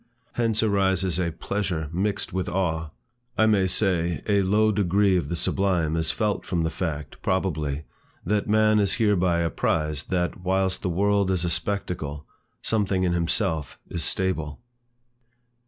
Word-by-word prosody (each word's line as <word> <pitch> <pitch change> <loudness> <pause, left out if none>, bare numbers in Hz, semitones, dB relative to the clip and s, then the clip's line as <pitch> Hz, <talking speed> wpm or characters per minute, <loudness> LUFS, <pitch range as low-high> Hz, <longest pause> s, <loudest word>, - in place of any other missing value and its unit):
Hence 115 -2 0
arises 95 -4 +1
a 85 -2 0
pleasure 85 -2 -3
mixed 100 +4 -2
with 95 -1 -2
awe; 80 -4 -1 0.5
I 110 - +5
may 100 -4 +3
say, 90 -4 +1
a 100 -2 +3
low 105 +3 +3
degree 100 -1 +2
of 90 - -1
the 85 - -1
sublime 85 -3 +1
is 80 -1 0
felt 105 +1 0
from 85 -2 -1
the 80 - -1
fact, 75 -6 -5
probably, 80 -6 -1 0.4
that 105 +2 0
man 110 0 +4
is 100 -2 +2
hereby 95 -6 +2
apprized, 75 -2 -1
that, 90 -1 -1
whilst 95 0 0
the - - -1
world 100 +2 +2
is 90 -2 +1
a 85 - 0
spectacle, 80 -8 -3 0.4
something 100 -4 0
in 90 -1 +1
himself 85 - -1
is 85 - -1
stable. 80 -6 -1
95 Hz, 150 wpm, -25 LUFS, 85-100 Hz, 0.5 s, I